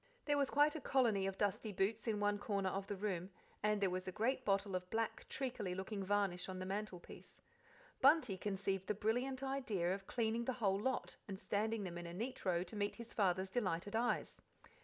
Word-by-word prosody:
There 290 Hz, -, +3 dB
was 280 Hz, -, +2 dB
quite 295 Hz, +1 st, +4 dB
a 315 Hz, -, -3 dB
colony 225 Hz, -9 st, +3 dB
of 195 Hz, 0 st, -3 dB
dusty 205 Hz, +1 st, 0 dB
boots 205 Hz, +4 st, 0 dB
in 215 Hz, -2 st, +1 dB
one 205 Hz, 0 st, +2 dB
corner 200 Hz, -3 st, 0 dB
of 195 Hz, +1 st, -3 dB
the 205 Hz, -, -2 dB
room, 190 Hz, -3 st, -2 dB, 0.3 s
and 210 Hz, 0 st, +2 dB
there 195 Hz, -2 st, +3 dB
was 185 Hz, +1 st, -3 dB
a -, -, -1 dB
great 235 Hz, +7 st, 0 dB
bottle 200 Hz, -2 st, +1 dB
of 180 Hz, 0 st, -3 dB
black, 225 Hz, +1 st, -2 dB
treacly 240 Hz, -9 st, -2 dB
looking 195 Hz, +1 st, -3 dB
varnish 195 Hz, -2 st, +1 dB
on 185 Hz, -, -4 dB
the 185 Hz, -, -4 dB
mantelpiece. 195 Hz, -2 st, -6 dB, 0.6 s
Bunty 275 Hz, -6 st, +6 dB
conceived 195 Hz, -1 st, -2 dB
the 210 Hz, -, +1 dB
brilliant 250 Hz, +6 st, 0 dB
idea 225 Hz, -10 st, 0 dB
of 195 Hz, 0 st, -6 dB
cleaning 230 Hz, 0 st, 0 dB
the 260 Hz, -, 0 dB
whole 195 Hz, -4 st, +2 dB
lot 260 Hz, +4 st, -1 dB
and 195 Hz, -2 st, -5 dB
standing 215 Hz, +1 st, 0 dB
them 175 Hz, -2 st, -4 dB
in 175 Hz, -, -6 dB
a 170 Hz, -, -6 dB
neat 235 Hz, +7 st, -4 dB
row 175 Hz, -2 st, +2 dB
to 185 Hz, +4 st, -8 dB
meet 205 Hz, 0 st, 0 dB
his 235 Hz, 0 st, -9 dB
father's 190 Hz, -2 st, +2 dB
delighted 200 Hz, -3 st, -1 dB
eyes. 240 Hz, +2 st, 0 dB
205 Hz, 205 wpm, -39 LUFS, 190-230 Hz, 0.6 s, Bunty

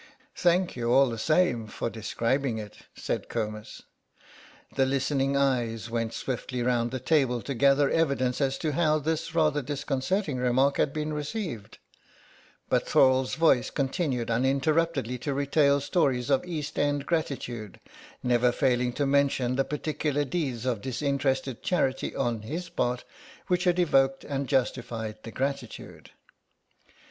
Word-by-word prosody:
"Thank 180 Hz, 0 st, +2 dB
you 120 Hz, -1 st, -1 dB
all 135 Hz, 0 st, +5 dB
the 115 Hz, -, -5 dB
same 130 Hz, -6 st, +2 dB
for 105 Hz, -, -4 dB
describing 115 Hz, +3 st, -1 dB
it," 105 Hz, -1 st, -7 dB, 0.2 s
said -, -, -3 dB
Comus. 110 Hz, -2 st, -5 dB, 0.9 s
The 135 Hz, -1 st, +2 dB
listening 135 Hz, 0 st, 0 dB
eyes 120 Hz, -5 st, 0 dB
went 115 Hz, -1 st, -2 dB
swiftly 125 Hz, -1 st, -3 dB
round 120 Hz, -1 st, +1 dB
the 130 Hz, +1 st, -4 dB
table 130 Hz, -2 st, +2 dB
to 140 Hz, -, -3 dB
gather 140 Hz, +3 st, +4 dB
evidence 140 Hz, -5 st, +1 dB
as 135 Hz, -1 st, +1 dB
to 155 Hz, -, +1 dB
how 155 Hz, 0 st, +2 dB
this 160 Hz, +2 st, -2 dB
rather 155 Hz, -2 st, +2 dB
disconcerting 145 Hz, +4 st, -2 dB
remark 125 Hz, +3 st, +2 dB
had 145 Hz, -, +2 dB
been 155 Hz, +1 st, -3 dB
received, 150 Hz, -, -5 dB, 0.9 s
but -, -, +1 dB
Thorle's 130 Hz, -1 st, +3 dB
voice 160 Hz, -6 st, +3 dB
continued 135 Hz, -4 st, -1 dB
uninterruptedly 135 Hz, +1 st, +1 dB
to 140 Hz, +2 st, -3 dB
retail 140 Hz, 0 st, +3 dB
stories 135 Hz, -4 st, 0 dB
of 135 Hz, -, +3 dB
East 155 Hz, -4 st, -4 dB
end 145 Hz, -1 st, 0 dB
gratitude, 125 Hz, -, -3 dB, 0.4 s
never 125 Hz, 0 st, +3 dB
failing 125 Hz, -2 st, +1 dB
to 145 Hz, -, 0 dB
mention 135 Hz, -3 st, +2 dB
the 135 Hz, -, +2 dB
particular 150 Hz, 0 st, -2 dB
deeds 130 Hz, -6 st, -3 dB
of 120 Hz, -5 st, -1 dB
disinterested 135 Hz, 0 st, -1 dB
charity 135 Hz, -7 st, 0 dB
on 120 Hz, -4 st, -1 dB
his 165 Hz, +10 st, -5 dB
part 125 Hz, -4 st, -1 dB, 0.4 s
which 180 Hz, -1 st, 0 dB
had 180 Hz, -1 st, +3 dB
evoked 135 Hz, -6 st, +2 dB
and 140 Hz, -1 st, -3 dB
justified 115 Hz, -5 st, -1 dB
the 115 Hz, -, -9 dB
gratitude. 135 Hz, -2 st, -5 dB
135 Hz, 140 wpm, -27 LUFS, 125-150 Hz, 0.9 s, all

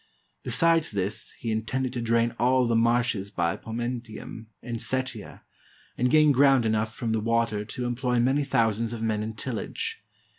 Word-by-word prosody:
Besides 165 Hz, -1 st, +3 dB
this, 100 Hz, 0 st, -3 dB
he 115 Hz, -, -3 dB
intended 125 Hz, +4 st, -2 dB
to 120 Hz, -, -3 dB
drain 115 Hz, 0 st, +1 dB
all 125 Hz, +1 st, +3 dB
the 115 Hz, -1 st, +1 dB
marshes 115 Hz, -3 st, +1 dB
by 85 Hz, -1 st, -1 dB
Pomentium 115 Hz, 0 st, -6 dB, 0.2 s
and 120 Hz, -1 st, -4 dB
Setia, 130 Hz, -3 st, -4 dB, 0.5 s
and 125 Hz, +1 st, +1 dB
gain 155 Hz, +1 st, +5 dB
ground 135 Hz, -2 st, +4 dB
enough 110 Hz, 0 st, 0 dB
from 115 Hz, -2 st, -2 dB
the 110 Hz, -, +1 dB
water 115 Hz, -2 st, 0 dB
to 125 Hz, +3 st, -5 dB
employ 125 Hz, 0 st, 0 dB
many 135 Hz, +4 st, +2 dB
thousands 115 Hz, -3 st, +1 dB
of 115 Hz, -1 st, -5 dB
men 110 Hz, -2 st, 0 dB
in 110 Hz, +1 st, -5 dB
tillage. 115 Hz, 0 st, -4 dB
115 Hz, 160 wpm, -26 LUFS, 110-125 Hz, 0.5 s, gain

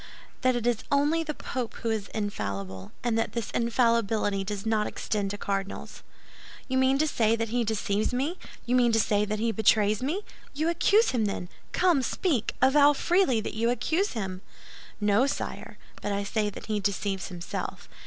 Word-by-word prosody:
"That 255 Hz, -1 st, +3 dB
it 240 Hz, -1 st, -2 dB
is 240 Hz, -3 st, +1 dB
only 295 Hz, +4 st, +3 dB
the 305 Hz, -2 st, -4 dB
Pope 250 Hz, -4 st, -4 dB
who 230 Hz, -, +1 dB
is 215 Hz, -2 st, -2 dB
infallible, 100 Hz, -, -4 dB
and 230 Hz, -2 st, +1 dB
that -, -, -1 dB
this 235 Hz, -3 st, -3 dB
infallibility 230 Hz, -4 st, +1 dB
does 200 Hz, +1 st, -5 dB
not 220 Hz, -1 st, +1 dB
extend 205 Hz, -2 st, -2 dB
to 205 Hz, -, -4 dB
cardinals." 195 Hz, -1 st, -4 dB, 0.7 s
"You 260 Hz, -1 st, +1 dB
mean 260 Hz, +1 st, +4 dB
to 310 Hz, +2 st, +2 dB
say 225 Hz, -6 st, +2 dB
that 230 Hz, -1 st, -2 dB
he 240 Hz, +1 st, +1 dB
deceives 210 Hz, -1 st, 0 dB
me; 280 Hz, +9 st, -1 dB, 0.3 s
you 245 Hz, -, -1 dB
mean 245 Hz, -2 st, +4 dB
to 225 Hz, -, +4 dB
say 210 Hz, -1 st, +2 dB
that 210 Hz, +1 st, -2 dB
he 225 Hz, +2 st, +1 dB
betrays 215 Hz, -1 st, +3 dB
me? 325 Hz, +11 st, -1 dB, 0.3 s
You 310 Hz, +3 st, +1 dB
accuse 415 Hz, +6 st, +4 dB
him, 230 Hz, -4 st, +1 dB
then? 190 Hz, -3 st, -3 dB, 0.2 s
Come, 350 Hz, -6 st, +3 dB
speak; 255 Hz, -, 0 dB
avow 285 Hz, +2 st, +6 dB
freely 315 Hz, -, +2 dB
that -, -, -5 dB
you 230 Hz, +2 st, +1 dB
accuse 320 Hz, -, 0 dB
him!" 190 Hz, -5 st, -4 dB, 0.6 s
"No, 210 Hz, +5 st, +3 dB
sire, -, -, -5 dB, 0.2 s
but 205 Hz, -, -2 dB
I 200 Hz, 0 st, -1 dB
say 210 Hz, +1 st, 0 dB
that 205 Hz, -, -9 dB
he 215 Hz, -1 st, -1 dB
deceives 195 Hz, -1 st, -1 dB
himself. 175 Hz, -2 st, -6 dB
225 Hz, 185 wpm, -27 LUFS, 205-260 Hz, 0.7 s, avow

